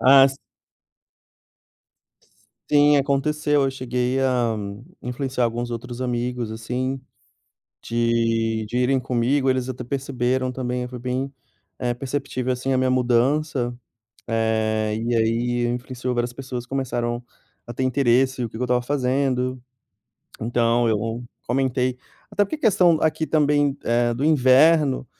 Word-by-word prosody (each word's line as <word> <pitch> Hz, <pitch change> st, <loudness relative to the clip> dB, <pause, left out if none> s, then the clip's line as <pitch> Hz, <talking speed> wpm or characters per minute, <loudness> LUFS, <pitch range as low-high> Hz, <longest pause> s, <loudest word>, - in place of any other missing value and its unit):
A 135 Hz, +1 st, +7 dB
si 135 Hz, 0 st, -8 dB, 1.9 s
S -, -, -31 dB, 0.5 s
sim, 145 Hz, 0 st, +6 dB
aconteceu. 145 Hz, +1 st, +1 dB
Eu 135 Hz, -, +1 dB
cheguei 125 Hz, 0 st, -1 dB
a 125 Hz, -4 st, +1 dB, 0.5 s
influenciar 125 Hz, +1 st, -2 dB
alguns 120 Hz, +1 st, -2 dB
outros 120 Hz, +1 st, -6 dB
amigos, 125 Hz, -2 st, -2 dB
assim, 125 Hz, +4 st, -3 dB, 0.8 s
de 115 Hz, -1 st, 0 dB
de 120 Hz, -, -4 dB
irem 130 Hz, +1 st, +2 dB
comigo. 130 Hz, +3 st, +1 dB
Eles 130 Hz, -1 st, 0 dB
até 125 Hz, -1 st, -5 dB
perceberam 130 Hz, -1 st, -1 dB
também, 125 Hz, -1 st, -3 dB
foi 125 Hz, 0 st, -8 dB
bem, 130 Hz, +2 st, -3 dB, 0.5 s
eh, 120 Hz, -1 st, -1 dB
perceptível, 130 Hz, 0 st, -3 dB
assim, 125 Hz, +2 st, -2 dB
a 130 Hz, -, +2 dB
minha 130 Hz, 0 st, +2 dB
mudança. 130 Hz, +1 st, +1 dB, 0.5 s
Eh, 110 Hz, -1 st, 0 dB
e 115 Hz, +2 st, -1 dB
aí 120 Hz, +2 st, +1 dB
influenciou, 125 Hz, +1 st, -3 dB
várias 120 Hz, 0 st, -1 dB
pessoas 125 Hz, -2 st, -6 dB
começaram 120 Hz, -2 st, -2 dB, 0.4 s
a 120 Hz, -, -6 dB
ter 130 Hz, -, -2 dB
interesse, 130 Hz, 0 st, +2 dB
o 115 Hz, -, -3 dB
que -, -, -13 dB
que -, -, -6 dB
eu -, -, +1 dB
estava 125 Hz, 0 st, +1 dB
fazendo, 130 Hz, -1 st, 0 dB, 0.8 s
então 120 Hz, 0 st, +2 dB
eu 115 Hz, +2 st, -1 dB, 0.2 s
comentei 130 Hz, 0 st, 0 dB, 0.3 s
até 205 Hz, -, +2 dB
porque 200 Hz, -, -5 dB
a -, -, -22 dB
questão 180 Hz, -, +4 dB
aqui 160 Hz, 0 st, +1 dB
também, 145 Hz, -2 st, +2 dB
eh, 120 Hz, 0 st, +2 dB
do 130 Hz, +4 st, -2 dB
inverno 145 Hz, -1 st, +4 dB
125 Hz, 135 wpm, -23 LUFS, 120-135 Hz, 1.9 s, A